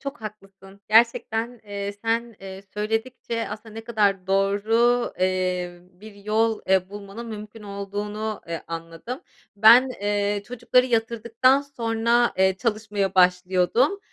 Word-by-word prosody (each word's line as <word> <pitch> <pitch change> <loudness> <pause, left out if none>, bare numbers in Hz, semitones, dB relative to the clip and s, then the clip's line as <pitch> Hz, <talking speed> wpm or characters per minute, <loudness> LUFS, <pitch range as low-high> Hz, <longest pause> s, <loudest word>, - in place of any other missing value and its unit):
Çok 275 -4 -6
haklısın. 195 -2 -11
Gerçekten, 230 +1 +2
eee, 200 -1 -4
sen, 230 -1 -1
eee, 195 0 -9
söyledikçe 225 +2 -3
aslında 215 +1 -8
ne 225 0 -8
kadar 200 -5 +1
doğru, 215 +5 +2
eee, 185 -1 -1
bir 200 +3 -14
yol, 215 +2 0
eee, 190 -1 +3
bulmanın 205 +3 -8
mümkün 215 0 -9
olduğunu, 205 +2 -5
eee, 165 -2 -4
anladım. 165 - -7 0.4
Ben, 235 +5 +7
eee, 205 0 0
çocukları 250 +1 +2
yatırdıktan 235 +3 +2
sonra, 235 -3 +1
eee, 190 0 +3
çalışmaya 210 -4 -1
başlıyordum. 185 - +3
210 Hz, 120 wpm, -24 LUFS, 195-230 Hz, 0.4 s, Ben